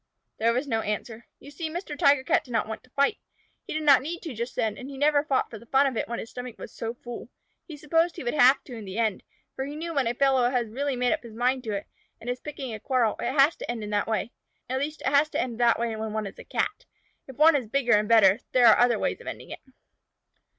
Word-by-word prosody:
There 230 +1 +3
was 250 +5 -1
no 225 -4 0
answer. 220 +2 -5
You 285 - -13
see 315 +2 -5
Mr. 325 -2 -5
Tiger 280 -1 +4
Cat - - +2
did - - -18
not 225 -1 +1
want 220 - -6
to - - -26
fight. 280 - +1 0.5
He - - -4
did 310 - -2
not 280 -3 +6
need 335 +5 -6
to 320 -6 -5
just 235 +2 -5
then, 215 -2 0
and 260 +5 -9
he 275 - -8
never 290 +1 +3
fought 275 -3 0
for 220 - -8
the 235 - -17
fun 270 +3 +4
of 265 -3 -1
it - - -2
when 235 - -3
his 225 - -7
stomach 250 -2 -7
was - - -10
so 230 +1 -5
full. 240 0 -9 0.4
He 310 -4 -8
supposed 325 +3 +1
he 335 - -7
would 240 - -1
have 270 -2 +5
to 250 - -11
in 225 -3 -8
the 190 +2 -7
end, 220 -4 0 0.3
for 265 - -3
he 285 +2 -6
knew 330 +2 -5
when 275 -5 +1
a 235 - -1
fellow 265 -2 +3
has 245 -3 -1
really 275 +4 -2
made 250 0 +1
up - - -3
his 230 -2 -12
mind 250 +2 0
to 215 - -2
it, 200 0 -3 0.3
and 245 - -4
is 250 - -5
picking 275 -5 -6
a 215 - -6
quarrel, 240 -2 +1
it 240 - -1
has 285 +3 +5
to - - -8
end 235 -2 -3
in 210 - -6
that 205 0 0
way. 220 0 -1 0.4
At 260 +1 -1
least, 300 +2 -4
it 265 - -1
has 290 +2 +4
to - - -2
end 255 - -1
in 230 - -8
that 235 -1 +4
way 230 -1 -2
when 220 0 -4
one 215 -1 -2
is 195 - -9
a - - -10
Cat. 420 - -2 0.4
If 265 - -10
one 310 +3 +6
is 255 -6 -1
bigger 245 0 +1
and 210 +1 +3
better, 215 -2 +6
there 250 -1 +5
are 225 - +7
other 245 0 +4
ways - - -2
of - - -13
ending - - -7
it. - - -7
250 Hz, 285 wpm, -26 LUFS, 225-280 Hz, 0.5 s, are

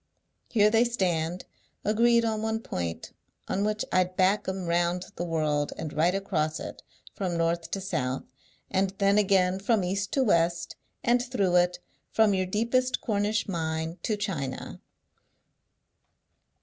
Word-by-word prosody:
Here 210 -2 +4
they 225 +1 +5
stand, 180 -7 -1 0.4
agreed 235 +2 +4
on 220 -1 -1
one 220 0 -1
point, 85 - -4 0.4
on 200 - 0
which 215 0 0
I'd 185 0 +1
back 195 +3 +3
'em 190 -1 -3
round 175 +1 +1
the 175 - -3
world, 155 -3 0
and 155 -2 -5
right 170 +4 +2
across 155 -6 -1
it - - -7 0.3
from 180 -4 -2
north 165 0 0
to 195 - -2
south, 130 -9 -2 0.5
and 195 0 +1
then 200 +1 +4
again 190 -2 +3
from 205 0 +2
east 195 +2 -2
to 270 - +3
west, 170 -5 +1 0.3
and 240 +1 +3
through 200 -8 0
it, 180 0 +3 0.3
from 220 -2 +3
your 185 -1 0
deepest 235 +6 +1
Cornish 210 -1 0
mine 160 -1 -3
to 215 -3 -1
China. 165 -10 -4
190 Hz, 145 wpm, -27 LUFS, 170-210 Hz, 0.5 s, they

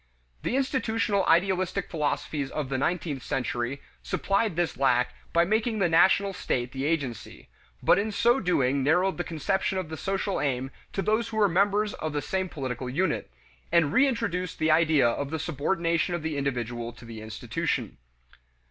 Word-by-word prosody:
The - - -1
institutional 225 -7 0
idealistic 185 +2 +2
philosophies 150 -2 -1
of 145 -2 -3
the 135 - -1
nineteenth 160 -3 -1
century 125 +1 -2 0.2
supplied 200 -1 0
this 175 0 0
lack 125 -2 +2 0.2
by 170 0 +4
making 220 +3 +1
the 195 -4 +3
national 190 +4 +4
state 125 -8 -2
the 135 +1 -3
agency, 145 -7 -3 0.3
but - - +5
in 215 +2 -1
so 240 +5 +3
doing 140 - +1
narrowed 175 +7 +2
the - - +1
conception 190 +4 -1
of 185 -4 -3
the 160 - -5
social 195 +2 -1
aim 130 -2 -1 0.2
to 195 - -1
those 220 +2 +1
who 220 - -5
were 210 -1 +5
members 205 +3 +2
of 155 -1 -4
the 145 - -1
same 190 +2 -1
political 130 -5 -4
unit, 175 +9 -1 0.4
and 160 -4 +3
reintroduced 230 -10 +1
the 155 0 +2
idea 155 -4 +4
of 135 +4 -1
the 160 - -2
subordination 170 +2 0
of 170 - -5
the 160 -2 -2
individual 120 -4 -2
to 120 - -14
the 115 -1 -8
institution. 110 - -3
165 Hz, 165 wpm, -27 LUFS, 135-195 Hz, 0.4 s, but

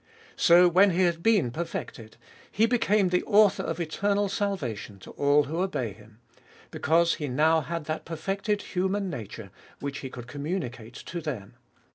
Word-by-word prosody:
So, 175 +1 +6
when 185 +4 +5
He 185 +1 +1
had 170 -2 +1
been 200 - +3
perfected, 125 -7 -6 0.3
He 220 - +3
became 215 -5 +2
the 180 0 +2
author 210 -2 +4
of 165 +1 -4
eternal 200 +5 0
salvation 145 - -3
to 95 - -12
all 145 +1 +3
who 160 +5 -3
obey 130 - -2
Him, 105 +2 -18 0.5
because 165 +2 +2
He 150 - -4
now 155 +5 +3
had 165 0 -5
that 155 +1 -4
perfected 195 +5 -2
human 190 +1 -1
nature 110 - -8 0.3
which 140 0 -5
He 130 - -6
could 120 -2 -9
communicate 130 - -5
to 170 0 -6
them. 125 -11 -6
165 Hz, 160 wpm, -27 LUFS, 130-190 Hz, 0.5 s, So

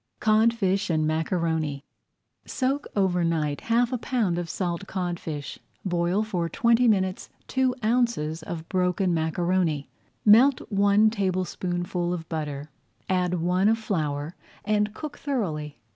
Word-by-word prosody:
CODFISH 215 -3 +2
AND 155 -2 +1
MACARONI 160 -2 -1 0.6
Soak 275 +2 -1
over 185 -3 +2
night 155 -3 0
half 240 +2 +1
a 250 - -1
pound 215 -9 0
of 170 -1 -4
salt 180 +2 -3
codfish. 170 -6 -4 0.3
Boil 175 +3 +1
for 180 -6 -2
twenty 235 +4 +3
minutes 190 -4 +1 0.2
two 260 -1 +1
ounces 225 -10 +1
of 160 0 -6
broken 180 0 +1
macaroni. 165 -1 0 0.3
Melt 245 +6 +7
one 205 +2 +4
tablespoonful 180 -3 -2
of 165 -2 -8
butter, 150 -2 -4 0.4
add 180 -1 +1
one 180 +4 +2
of 225 - +3
flour, 155 -7 -2 0.3
and 210 0 +1
cook 300 -2 -7
thoroughly. 160 - -3
180 Hz, 125 wpm, -26 LUFS, 165-215 Hz, 0.6 s, Melt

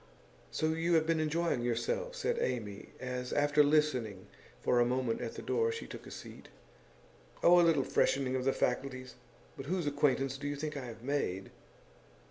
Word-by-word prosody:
'So 155 - 0
you 165 +2 +1
have 160 -1 +4
been 165 0 +1
enjoying 155 -3 0
yourself?' 485 - -1
said 480 -1 -1
Amy 105 - -3
as, 125 0 -4
after 145 0 +4
listening 130 -10 +1 0.3
for 125 - +2
a - - +6
moment 125 -1 0
at 115 - -4
the - - -7
door, 115 -3 +1
she - - -5
took - - -9
a - - -8
seat. - - -10 0.9
'Oh, 175 +1 +8
a - - +7
little 165 -5 +4
freshening 130 -1 +1
of 130 - -1
the 135 - +3
faculties. 130 -1 -2 0.4
But 135 - -8
whose 180 0 -1
acquaintance 135 -2 +1
do 145 - -4
you 145 - -2
think 150 +1 -4
I 140 -3 -4
have 115 -1 -9
made? 125 -9 -2
135 Hz, 180 wpm, -32 LUFS, 125-155 Hz, 0.9 s, Oh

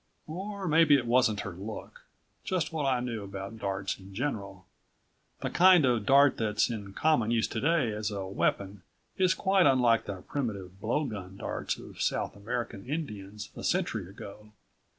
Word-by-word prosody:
Or 195 +4 -5
maybe 155 -1 +6
it 125 - -2
wasn't 120 -3 +3
her 100 - -5
look, 100 +5 -8 0.4
just 180 -3 -1
what 150 -3 0
I 130 -2 +2
knew 120 -3 -3
about 100 +3 -7
darts 100 -1 -2
in 95 0 -13
general. 100 -7 -4 0.8
The - - -2
kind 180 -4 +6
of 120 -5 +1
dart 140 +1 +6
that's 110 +1 +1
in 100 -4 -6
common 150 -7 +2
use 115 -1 +2
today 135 +1 +1
as 105 0 -2
a 100 -2 -4
weapon 95 0 -1 0.4
is 185 -1 +3
quite 190 -1 +3
unlike 120 -4 +4
the 95 -3 -6
primitive 100 -9 -4
blowgun 110 -6 -2
darts - - -3
of - - -10
South - - -1
American 110 -1 -4
Indians 105 -9 -5
a - - -8
century 120 - -1
ago. 105 +2 -11
115 Hz, 160 wpm, -29 LUFS, 100-145 Hz, 0.8 s, maybe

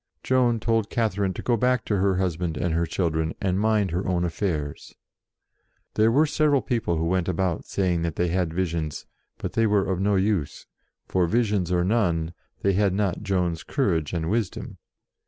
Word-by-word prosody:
Joan 125 -3 +2
told 115 0 0
Catherine 100 -5 0
to - - -6
go 120 - +2
back 125 +1 +1
to 105 - 0
her 95 0 +2
husband 90 -3 -1
and 85 0 -1
her 85 +1 +1
children, 80 -3 -1
and 95 -1 0
mind 105 -3 +2
her 90 +3 -2
own 90 -1 +1
affairs. 80 -5 -3 1.0
There 110 +1 +3
were 145 +6 +4
several 150 -2 +2
people 115 -10 -1
who 80 - 0
went 90 0 0
about 90 -2 -1
saying 90 -4 0
that 85 -2 -2
they 90 0 0
had 90 -1 0
visions; 80 -4 -2 0.3
but - - -5
they 115 -1 +3
were 105 -2 +2
of 95 -2 -1
no 100 +1 +2
use, 95 -6 0 0.4
for, 90 -2 +1
visions 105 -4 +1
or 90 -1 +2
none, 85 -6 +1 0.3
they 100 - +3
had 100 -1 +2
not 100 -3 0
Joan's 90 -5 -1
courage 85 - 0
and 80 -2 -2
wisdom. 105 0 -2
95 Hz, 180 wpm, -25 LUFS, 85-105 Hz, 1.0 s, were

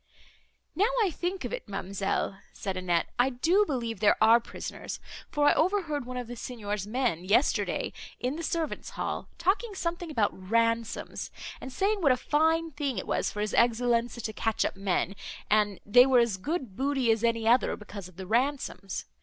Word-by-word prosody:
"Now 410 +5 +3
I 385 - +1
think 360 +4 -3
of - - -4
it, - - -5
ma'amselle," 195 0 -2
said 195 -1 -4
Annette, 175 -2 0
"I 250 +2 +5
do 335 +11 +3
believe 235 -6 -2
there 210 0 +5
are 225 +2 +7
prisoners, 235 - -7 0.3
for 290 -1 +2
I - - +6
overheard 320 -6 +1
one 250 0 -5
of 250 - -3
the 240 +1 -7
Signor's 210 -5 -4
men, 230 -7 0
yesterday, 205 +9 +1 0.3
in 255 +3 -1
the 330 - -5
servants 330 -1 -2
hall, - - -4
talking 390 +5 0
something 345 -1 -3
about 225 -9 +1
ransoms, 230 +4 -1 0.3
and 265 - -7
saying 400 +7 +1
what 285 -5 +5
a 255 - +3
fine 320 +4 +2
thing 280 -4 -2
it - - -3
was - - 0
for 210 - -4
his 210 - -2
Excellenza 235 0 +2
to 220 - -3
catch 220 +1 0
up - - -2
men, 195 0 -1 0.4
and 210 -2 +3
they 245 +5 +7
were 260 -2 +5
as 235 -5 +3
good 260 - -3
booty 270 -2 +1
as 225 0 0
any 230 -1 +1
other, 245 +3 +4
because 205 -3 -9
of 185 -1 -18
the 190 - -6
ransoms. 240 -2 -1
240 Hz, 185 wpm, -28 LUFS, 210-300 Hz, 0.4 s, are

